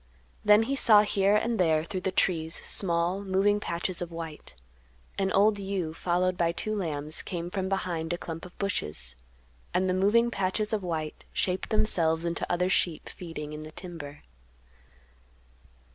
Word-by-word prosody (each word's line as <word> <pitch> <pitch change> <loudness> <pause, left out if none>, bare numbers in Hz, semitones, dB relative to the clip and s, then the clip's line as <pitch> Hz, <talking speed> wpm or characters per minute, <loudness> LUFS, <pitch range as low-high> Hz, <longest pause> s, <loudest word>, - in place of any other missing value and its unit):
Then 210 +1 +6
he 270 +5 -1
saw 215 -6 +7
here 200 -1 +3
and 225 +1 +1
there 160 -3 +3
through 185 +2 -4
the 190 - -1
trees 165 -3 +1
small, 175 +1 0
moving 200 +2 +2
patches 175 -1 -2
of 175 -1 -4
white; 165 - -8 0.6
an 190 -1 +1
old 205 +2 +4
ewe 190 -5 -2
followed 180 +2 0
by 170 -1 +3
two 215 +5 -2
lambs 155 -5 -2
came 175 -1 -5
from 190 -1 -2
behind 175 -4 -1
a 175 - 0
clump 165 -1 -6
of 180 - -11
bushes, 75 - -3 0.6
and 185 +1 +3
the 185 - +2
moving 215 +6 +3
patches 200 +2 0
of 215 - +1
white 160 -4 -4
shaped 185 0 0
themselves 165 -7 +1
into 170 -1 -2
other 180 +1 +2
sheep 175 -3 0
feeding 155 -4 -7
in 150 - -6
the 155 - -8
timber. 155 -4 -9
180 Hz, 160 wpm, -28 LUFS, 165-200 Hz, 0.6 s, saw